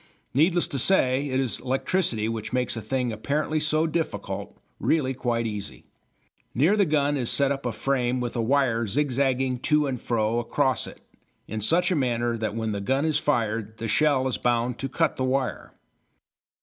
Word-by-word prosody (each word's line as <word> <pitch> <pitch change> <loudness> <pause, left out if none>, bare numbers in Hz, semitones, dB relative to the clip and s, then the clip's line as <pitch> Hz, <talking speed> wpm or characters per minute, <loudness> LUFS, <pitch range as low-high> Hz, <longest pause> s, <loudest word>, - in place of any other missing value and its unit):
Needless 170 +5 +3
to 135 - -2
say, 135 -4 +2
it 130 0 0
is 130 -3 0
electricity 130 - 0
which 110 -1 -4
makes 125 -1 0
a 115 - -4
thing 125 +2 -1
apparently 150 +7 -1
so 155 +1 +2
difficult 100 - -3 0.2
really 140 -5 +1
quite 120 -2 -1
easy. 105 -2 -6 0.7
Near 160 - +4
the 200 -3 +3
gun 145 -1 +1
is 125 -3 -2
set 140 -1 +2
up 135 -2 -2
a - - -1
frame 125 +2 0
with 120 0 -3
a 120 - 0
wire 115 -2 +1
zigzagging 130 0 0
to 150 +3 +2
and 130 -4 -3
fro 115 0 0
across 130 +1 0
it, - - -12 0.5
in 110 +1 -4
such 175 - +3
a - - +2
manner 120 -4 0
that 110 -1 -3
when 110 -1 -2
the 100 -1 -3
gun 135 +8 0
is 155 -2 +2
fired 110 -6 -1
the 115 - -4
shell 135 +2 +2
is 130 - -2
bound 120 0 0
to 135 - -3
cut - - 0
the 130 - -1
wire. 130 0 -1
130 Hz, 185 wpm, -25 LUFS, 115-145 Hz, 0.7 s, Near